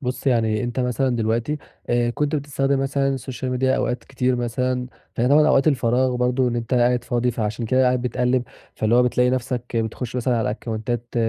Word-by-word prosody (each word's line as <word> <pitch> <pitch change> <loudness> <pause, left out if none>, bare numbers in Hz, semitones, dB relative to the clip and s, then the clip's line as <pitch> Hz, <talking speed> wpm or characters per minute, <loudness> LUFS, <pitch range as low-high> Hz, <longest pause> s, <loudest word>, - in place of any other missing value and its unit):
بُص، 125 0 -4
يعني 110 -4 +2
أنت 120 +1 -2
مثلًا 125 0 0
دلوقتي 115 +6 -1 0.3
آآ، 120 0 +2
كنت 150 +5 -1
بتستخدم 140 -1 0
مثلًا 135 0 0
السوشيال 130 -1 -4
ميديا 130 +1 +1
أوقات 120 -1 -2
كتير 130 -1 0
مثلًا 125 +1 -1 0.3
فهي 120 +2 +1
طبعًا 150 +2 +5
أوقات 140 0 +4
الفراغ 125 -2 +2
برضه 125 +1 +1
إن 120 - -2
أنت 120 +2 -2
قاعد 120 0 +2
فاضي 120 0 0
فعشان 110 0 -3
كده 130 +3 +3
قاعد 125 -1 +2
بتقلِّب، 125 +1 +1 0.3
فاللي 110 +2 +1
هو 125 - +6
بتلاقي 125 0 +2
نَفْسك 125 -1 -3
بتخُش 115 +2 -3
مثلًا 125 0 +1
على 110 - 0
أكاونتات 115 +2 -4
125 Hz, 185 wpm, -22 LUFS, 120-130 Hz, 0.3 s, هو